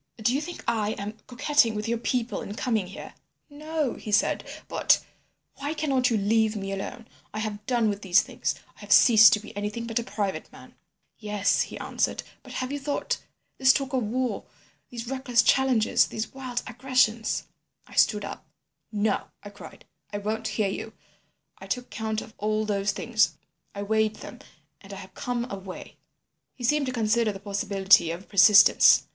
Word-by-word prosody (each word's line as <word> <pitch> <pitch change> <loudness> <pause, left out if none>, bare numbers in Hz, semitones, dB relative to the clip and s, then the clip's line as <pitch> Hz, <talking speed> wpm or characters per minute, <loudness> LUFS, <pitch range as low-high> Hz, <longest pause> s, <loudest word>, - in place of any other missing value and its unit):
Do 225 +2 +1
you 280 - 0
think 345 +3 -7
I 215 -2 0
am 210 +2 -6
coquetting 245 -2 +2
with 210 +1 -3
your 235 0 -1
people 245 0 -2
in 205 - -7
coming 220 -6 -1
here?' 190 - -10 0.4
"'No,' 305 -2 -2
he 215 - -8
said. 205 - +2 0.2
'But—' - - +2 0.5
"'Why 290 +3 -4
cannot 270 -5 +1
you 230 - +1
leave 220 +2 +2
me 195 -1 -4
alone. 220 +4 -6 0.3
I - - -3
have 210 -1 -4
done 240 -3 +2
with 205 -1 -2
these 185 -1 +4
things. - - -3 0.2
I - - -22
have - - -10
ceased 220 -3 +8
to 210 - +2
be 215 - -12
anything 210 +3 -4
but 230 0 -1
a - - -3
private 200 -2 -4
man.' - - -15 0.5
"'Yes,' 210 -2 +1
he - - -4
answered. - - -2 0.2
'But - - -12
have 255 +1 -3
you 285 - -3
thought?—this 270 -2 -1
talk 270 -2 -2
of 260 - +1
war, 245 +3 -2 0.4
these 235 -1 -7
reckless 260 -2 +1
challenges, 260 -5 +3
these 220 - -5
wild 255 -2 -4
aggressions—' 245 -3 +1 0.4
"I - - -17
stood 210 -2 +3
up. - - -8 0.5
"'No,' 215 0 0 0.2
I 205 - -9
cried. 205 - -13 0.3
'I 205 - -3
won't 220 +2 -3
hear 215 -3 +2
you. 215 +3 -5 0.7
I - - -10
took 250 0 -4
count 220 -1 -3
of 215 - -12
all 215 +1 0
those 200 -1 0
things, 220 +1 +1 0.4
I 200 - -4
weighed 220 +1 +1
them—and - - -14
I - - -7
have - - -11
come 245 -2 -3
away.' 195 -1 -8 0.6
"He 250 - -11
seemed 285 +3 +2
to - - -1
consider 230 -1 +1
the 195 - -8
possibility 195 -3 +3
of 170 +4 -6
persistence. 200 +1 +7
220 Hz, 175 wpm, -26 LUFS, 205-250 Hz, 0.7 s, ceased